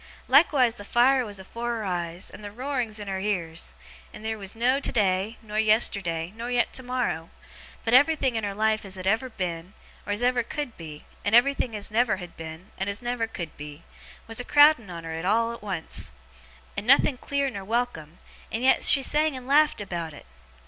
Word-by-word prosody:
Likewise 260 -8 +5
the 205 - -10
fire 255 +4 +3
was 205 -4 -7
afore 235 +5 -4
her 225 - -4
eyes, 175 -1 -3
and 210 - -12
the 205 - -6
roarings 250 -2 -3
in 205 - -7
her 190 -1 -2
ears; 175 -5 -3 0.4
and - - -11
theer 220 0 -2
was 200 -2 -6
no 250 +4 +2
today, 205 -3 +1
nor 215 0 -3
yesterday, 195 -6 +2
nor 235 +2 -5
yet 245 -1 +1
tomorrow; 250 -10 -2 0.6
but 225 - 0
everything 275 -2 +4
in 225 - -1
her 200 -1 -3
life 220 +1 +1
as 190 -1 -8
ever 215 +7 0
had 250 - -18
been, 180 0 -4 0.3
or - - -2
as 205 +4 0
ever 250 0 +3
could 255 +1 -5
be, 155 -3 -10 0.2
and 205 +2 +2
everything 250 -2 +3
as 205 0 -2
never 225 -2 +2
had 180 -2 -10
been, 160 +4 -9
and 190 +1 -1
as 200 +4 -4
never 240 -2 -1
could 170 -7 -6
be, 150 +2 -9 0.4
was 225 +1 -3
a - - -2
crowding 290 -6 +5
on 170 -1 -7
her 165 +2 -4
all 230 +3 +2
at 235 - -10
once, 185 - -4 0.6
and 210 - -4
nothing 275 +1 +5
clear 280 -1 -1
nor 200 -4 -6
welcome, 190 -8 -2 0.3
and 225 +3 -2
yet 265 - +4
she 275 - +6
sang 300 0 +2
and 255 - -9
laughed 295 +1 +4
about 170 -5 -5
it! - - -13
220 Hz, 200 wpm, -26 LUFS, 185-245 Hz, 0.6 s, she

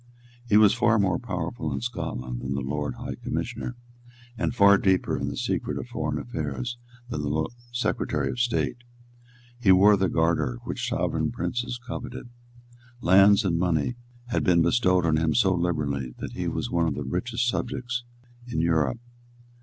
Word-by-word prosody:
He 105 - +6
was 105 -2 +6
far 115 - +3
more 95 -4 +2
powerful 95 -3 -4
in - - -2
Scotland 65 - -4
than 65 +1 -3
the 70 - -1
Lord 75 +2 -3
High - - -5
Commissioner, 120 - -3 0.6
and 120 0 -2
far 100 -2 +6
deeper 95 -2 +2
in - - -2
the - - -4
secret - - -2
of - - -6
foreign 75 -1 -2
affairs 120 - -4 0.3
than 75 - -3
the 75 +2 -1 0.2
Secretary 120 +1 -1
of 125 - -6
State. 120 0 0 0.8
He 105 -6 +5
wore 100 +3 +7
the 95 -2 +1
Garter, 80 -7 +1
which - - -3
sovereign - - 0
princes 120 0 -3
coveted. 120 0 -6 0.7
Lands 100 +2 +6
and 85 -3 +1
money 85 +4 +1 0.3
had 120 - 0
been 90 -5 +4
bestowed 90 -2 +3
on 80 -1 +3
him 80 -1 +1
so 95 - +4
liberally 75 -7 -1
that - - -6
he - - -3
was - - -3
one 85 -1 +2
of 75 - -1
the 75 - -3
richest 115 - -1
subjects 125 0 -2 0.4
in 120 - -2
Europe. 80 - +2
90 Hz, 165 wpm, -26 LUFS, 80-115 Hz, 0.8 s, wore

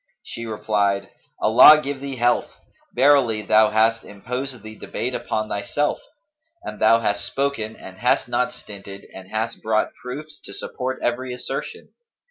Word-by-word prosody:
She 115 0 -7
replied, 100 -2 0 0.3
'Allah 155 0 +8
give 140 -2 -5
thee 140 -1 -5
health! 120 0 +1 0.4
verily, 125 -5 +4
thou 110 +1 +4
hast 110 +1 +2
imposed 125 +3 -6
the 110 0 -9
debate 125 +3 -4
upon 110 -3 -2
thyself; 110 +9 -1 0.6
and - - -7
thou 115 0 +5
hast 100 -2 0
spoken 135 -6 -2
and 95 0 -12
hast - - +2
not - - 0
stinted 100 -1 -11
and 95 0 -11
hast 110 +1 -3
brought 110 0 0
proofs 145 +5 -8
to 100 - -8
support 130 +4 -4
every 125 +1 -1
assertion. 125 - -6
115 Hz, 145 wpm, -22 LUFS, 105-130 Hz, 0.6 s, Allah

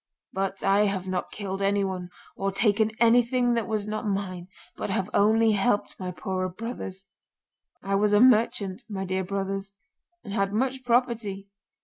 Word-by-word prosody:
But 195 0 -2
I 200 +2 +4
have 190 -2 -2
not 185 -1 -2
killed 195 -2 -5
anyone 195 -2 0 0.3
or 195 0 -1
taken 210 +2 +2
anything 240 +1 +4
that 230 -2 0
was 215 -2 -1
not 215 0 -3
mine, 185 -3 -3 0.3
but - - -4
have 190 0 -1
only 220 +2 +4
helped 205 0 +1
my 185 -1 -4
poorer 185 0 -3
brothers. 190 -2 -6 0.8
I 195 - -2
was 205 +1 +3
a 205 - +5
merchant, 215 -5 +3
my 190 -2 -3
dear 190 0 -1
brothers, 195 +1 -3 0.5
and 200 - -7
had 195 -1 0
much 260 +3 -1
property. 230 -5 0
200 Hz, 155 wpm, -26 LUFS, 190-220 Hz, 0.8 s, a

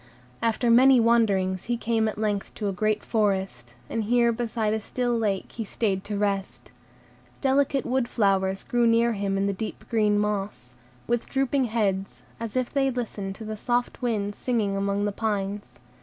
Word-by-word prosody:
After 230 +1 +1
many 255 +2 +7
wanderings, 200 -6 +2
he 240 0 -1
came 225 -1 +1
at 215 - -3
length 210 -2 -2
to 210 - -3
a - - 0
great 215 +3 0
forest, 190 - -1
and 225 -2 -2
here 235 +1 +3
beside 225 -2 -1
a 220 - 0
still 245 +3 -1
lake 210 -4 -1
he 230 - -4
stayed 195 -2 -1
to 205 -1 -3
rest. 195 -12 -2 0.7
Delicate 275 0 +2
wood 255 0 0
flowers 195 -4 +1
grew 240 -1 +2
near 230 +1 +3
him 200 -1 -1
in 195 - +1
the 200 - 0
deep 215 +3 -6
green 210 -2 +3
moss, 200 -12 -2 0.3
with 240 0 -1
drooping 270 0 +1
heads, 200 -4 -1 0.2
as 230 0 -5
if 255 -1 -1
they 275 -2 +2
listened 215 -6 -4
to 220 - -9
the 215 0 -4
soft 245 +4 -1
wind 210 -4 -1
singing 215 -4 -1
among 200 +1 0
the 205 - 0
pines. 205 -1 -3
215 Hz, 175 wpm, -26 LUFS, 200-235 Hz, 0.7 s, many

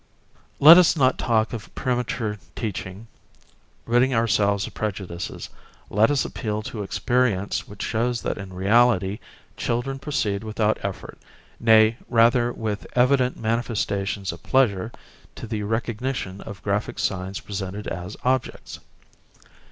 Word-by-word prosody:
Let 165 +5 +10
us 175 -2 +4
not 130 -4 +2
talk 110 -1 +1
of 115 -3 -8
premature 125 -4 -2 0.2
teaching; 100 -2 -5 0.8
ridding 125 +2 +3
ourselves 100 -3 +2
of - - -9
prejudices, 95 -5 -5 0.4
let 105 +2 +4
us 145 -2 +1
appeal 105 -3 -3
to 110 -1 -6
experience 105 -1 0
which 100 0 -7
shows 120 +2 -1
that - - -2
in 95 -2 -8
reality 100 +1 +2 0.4
children 135 +3 -2
proceed 110 -8 -2
without 110 0 0
effort, 100 -1 -6 0.4
nay 110 0 +5
rather 120 +1 +4
with 110 -3 -4
evident 125 0 +3
manifestations 105 -4 -1
of - - -11
pleasure 115 -5 +1 0.4
to - - -7
the 110 -2 -3
recognition 110 -1 -3
of 100 -1 -10
graphic 105 +1 -2
signs 95 -1 -2
presented 100 0 -6
as 90 +4 -6
objects. 130 -1 -2
110 Hz, 125 wpm, -24 LUFS, 100-120 Hz, 0.8 s, Let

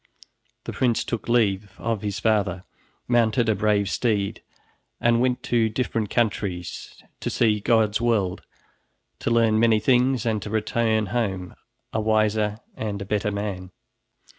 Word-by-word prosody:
The - - -6
prince 120 -3 +1
took 115 0 -4
leave 100 -4 +1
of 115 -3 -2
his 105 0 -3
father, 100 -5 +1 0.4
mounted 120 -1 +2
a 110 - +3
brave 105 0 +1
steed 100 -1 -1 0.6
and 120 0 +3
went 125 -1 0
to 115 -2 +2
different 115 -2 -2
countries, 95 -7 -2 0.2
to - - -3
see 110 -3 +2
God's 110 0 +2
world, 105 -6 +1 0.8
to - - -2
learn 115 -2 +3
many 115 -1 +4
things, 125 +2 +2
and 110 -2 0
to 105 - -6
return 110 0 +1
home 95 -7 -2 0.4
a 110 - 0
wiser 110 -1 +1 0.2
and 105 -2 -4
a 100 - -5
better 105 +1 -1
man. 100 -3 -4
110 Hz, 140 wpm, -24 LUFS, 100-115 Hz, 0.8 s, many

